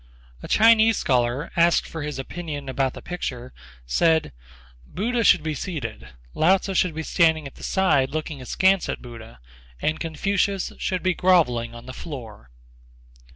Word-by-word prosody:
A - - -8
Chinese 225 0 +5
scholar, 125 +3 0
asked 170 0 +3
for 160 - -6
his 150 -1 -4
opinion 145 0 -6
about 130 0 -1
the - - -10
picture, 130 -8 -5 0.3
said: 160 - +2 0.5
"Buddha 230 - -2
should 175 -6 +5
be 155 -1 -2
seated; 145 - -5 0.3
Lao 185 +5 +4
Tzu 195 +1 -5
should 180 -3 +1
be 160 - -3
standing 160 -2 +2
at 135 - -8
the - - -16
side 145 -9 +2
looking 155 -1 -5
askance 190 +8 +2
at - - -4
Buddha; 115 - -11 0.4
and 155 - -1
Confucius 195 +4 -1
should 185 -1 -2
be 185 -1 +2
grovelling 135 -12 +2
on 120 +1 -11
the 130 - -8
floor." 115 - -9
155 Hz, 155 wpm, -23 LUFS, 130-185 Hz, 0.5 s, Chinese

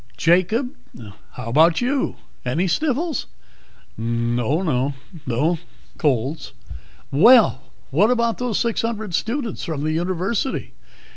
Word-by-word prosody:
"Jacob, 185 - +2 0.6
how 125 -2 -6
about 160 +7 +4
you? 260 +2 0 0.3
Any 140 +9 0
sniffles?" 300 - -1 0.7
"Oh, 120 +7 0
no. 140 -4 0 0.3
No 150 +8 +1 0.4
colds." 135 +2 -1 0.6
"Well, 195 - +6 0.3
what 190 - +4
about 235 -2 +1
those 245 -4 -1
six 235 -2 0
hundred 220 -4 -3
students 230 - -2
from 155 -3 -3
the 155 - 0
University? 185 +9 -2
175 Hz, 110 wpm, -22 LUFS, 140-235 Hz, 0.7 s, Well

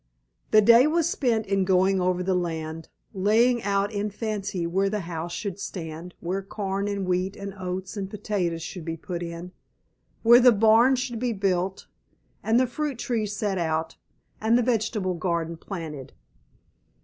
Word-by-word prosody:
The 215 - +6
day 235 +5 +7
was 330 +1 +2
spent 235 -9 0
in 195 -1 +1
going 190 0 +3
over 180 0 +1
the 190 +1 +1
land, 165 -2 -3 0.2
laying 225 +5 +3
out 200 0 0
in 205 +1 -1
fancy 205 -4 -3
where 190 +4 +1
the 210 0 -2
house 170 -1 -5
should 200 0 -4
stand, 170 -2 -7
where 185 +3 -2
corn 195 0 -3
and 200 -2 -2
wheat 185 +2 -1
and 200 0 -7
oats 185 0 -5
and 195 -2 -4
potatoes 190 -5 -2
should 180 0 -7
be 165 0 -4
put 175 +1 -5
in, 170 +1 -6 0.7
where 235 +1 +8
the 250 0 +7
barn 225 +5 +5
should 245 -2 -3
be 245 -1 0
built, 190 -2 -1 0.6
and 225 +2 +3
the 255 - +4
fruit 280 +1 -3
trees 220 -4 -2
set 200 -2 -1
out, 160 -1 -1 0.5
and 225 +2 +4
the 245 - +2
vegetable 220 -5 0
garden 170 -1 -2
planted. 160 -6 -7
195 Hz, 165 wpm, -25 LUFS, 175-220 Hz, 0.7 s, where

